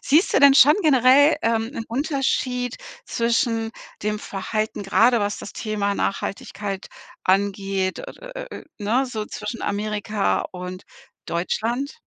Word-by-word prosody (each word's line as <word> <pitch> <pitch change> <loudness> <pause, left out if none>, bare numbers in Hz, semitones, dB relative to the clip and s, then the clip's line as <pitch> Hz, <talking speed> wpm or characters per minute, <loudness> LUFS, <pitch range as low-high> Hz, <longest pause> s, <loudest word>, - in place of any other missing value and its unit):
siehst 315 +7 +3
du - - +4
denn 280 -1 +8
schon 290 +2 +8
generell, 280 +1 +6
ähm, 225 -1 +1
'nen 230 -5 -6
Unterschied 255 -2 -1 0.3
zwischen 230 -1 0 0.3
dem 210 0 -1
Verhalten, 215 +2 -3
gerade 225 +5 +4
was 205 +1 -1
das - - -8
Thema 205 -2 -2
Nachhaltigkeit 200 0 -3 0.4
angeht, 195 0 0
äh, - - -6 0.2
äh, - - -7
äh, - - -7
äh, - - -15
ne? 225 +6 +1
So 215 -4 -4
zwischen 235 - -6
Amerika 210 0 -1
und 180 +1 -7 0.4
Deutschland? 235 - -2
225 Hz, 135 wpm, -23 LUFS, 200-255 Hz, 0.4 s, denn